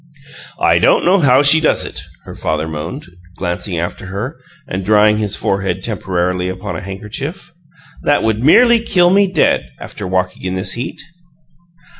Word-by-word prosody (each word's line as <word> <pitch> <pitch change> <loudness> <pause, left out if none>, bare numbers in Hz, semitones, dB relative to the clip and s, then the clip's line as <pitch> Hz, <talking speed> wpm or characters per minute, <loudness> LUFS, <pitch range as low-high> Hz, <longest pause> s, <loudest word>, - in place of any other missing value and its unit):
"I - - +3
don't - - +3
know 190 +3 +4
how 135 -3 +4
she 145 +3 +6
does 155 - +2
it!" - - -4 0.2
her - - -10
father 80 0 -2
moaned, 80 - -6 0.3
glancing 85 +1 -3
after 85 +3 -4
her 105 - -5 0.3
and 95 -3 -4
drying 105 +1 +4
his 105 -2 -1
forehead 95 -2 -2
temporarily 90 -4 -2
upon 95 +1 -5
a 80 - -5
handkerchief. 115 - -7 0.5
"That 145 - +2
would 110 +1 0
merely 235 - +6
kill 180 -6 +2
me 200 +1 +4
dead, - - +1
after 100 - -7
walking 90 0 -2
in 95 0 -3
this 95 0 -2
heat." 125 - -5
105 Hz, 160 wpm, -16 LUFS, 90-145 Hz, 0.5 s, she